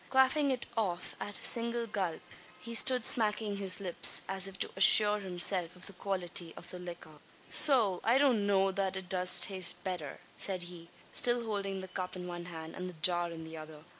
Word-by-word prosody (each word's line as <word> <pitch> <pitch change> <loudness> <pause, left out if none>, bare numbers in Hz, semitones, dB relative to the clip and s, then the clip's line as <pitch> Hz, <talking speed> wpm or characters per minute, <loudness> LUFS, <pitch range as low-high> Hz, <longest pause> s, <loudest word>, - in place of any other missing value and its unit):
Quaffing 265 +2 +1
it 255 -2 -3
off 190 -6 -4
at 205 - -5
a - - -11
single 235 0 0
gulp, 190 -6 -5 0.4
he 230 - -9
stood 250 +1 +3
smacking 210 -2 0
his 190 -2 +1
lips 185 -3 +2
as 195 0 +1
if 195 0 -11
to - - -4
assure 210 0 +7
himself 180 -2 +1
of 180 - -13
the 200 - -7
quality 180 -3 -3
of - - -12
the 180 - -9
liquor. 170 -4 -11 0.3
"Sowl! 225 - +4
I 235 +3 +2
don't 250 -8 +1
know 195 -1 +1
that 190 0 -3
it 190 -2 -8
does 180 0 +2
taste 185 -3 +1
betther," 175 -7 -6 0.2
said 185 -3 -2
he, 175 -1 -12 0.2
still 240 -1 +3
holding 195 -3 -5
the 190 - -9
cup 185 0 -7
in 180 -1 -8
one 175 -1 -8
hand, 160 -2 -10
and 185 0 -7
the 180 - -12
jar 175 0 +2
in 165 -1 -10
the 160 0 -11
other. 155 -1 -12
190 Hz, 200 wpm, -30 LUFS, 175-210 Hz, 0.4 s, assure